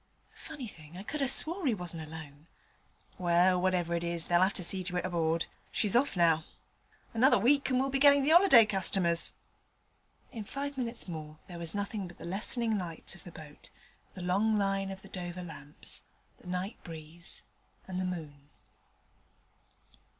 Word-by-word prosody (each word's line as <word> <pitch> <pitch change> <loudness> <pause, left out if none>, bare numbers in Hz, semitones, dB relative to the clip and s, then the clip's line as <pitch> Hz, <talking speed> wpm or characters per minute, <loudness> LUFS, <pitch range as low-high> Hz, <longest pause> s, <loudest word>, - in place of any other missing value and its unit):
Funny 300 -6 -8
thing: 160 -3 -12
I 190 - -7
could 300 +7 -4
'a' 275 - +2
swore 325 +6 +2
'e 235 - +3
wasn't 170 -4 -4
alone. 155 -1 -10 0.7
Well, 180 +1 +4
whatever 180 -2 +1
it 170 0 -1
was, 170 -1 0
they'll 175 0 +3
'ave 190 +2 +3
to 180 - -1
see 185 +2 0
to 180 -1 -1
it 180 - -1
aboard. 165 -2 0 0.3
She's 210 -2 0
off 245 -5 +3
now. 165 -2 +4 0.7
Another 250 +5 +5
week 275 +8 +3
and 255 - +2
we 260 - +3
shall 270 - -1
be 270 - +1
gettin' 285 0 +7
the 295 - +3
'oliday 340 - +8
customers.' 185 -4 +1 1.0
In 225 -4 -6
five 280 +6 -4
minutes 240 -4 -1
more 155 -3 -7
there 175 -2 -9
was 170 +2 -2
nothing 205 -1 -3
but 175 - -13
the - - -9
lessening 215 +4 0
lights 170 -3 -5
of 190 - -14
the 175 - -10
boat, 155 -2 -12 0.5
the 185 - -6
long 205 +5 +2
line 195 -1 0
of 190 0 -8
the - - -11
Dover 180 -1 -5
lamps, 150 -3 -6 0.4
the - - -15
night 185 +5 -4
breeze, 165 +1 -6 0.4
and 185 -1 -3
the - - -1
moon. 150 -5 -6
185 Hz, 180 wpm, -31 LUFS, 170-225 Hz, 1.0 s, oliday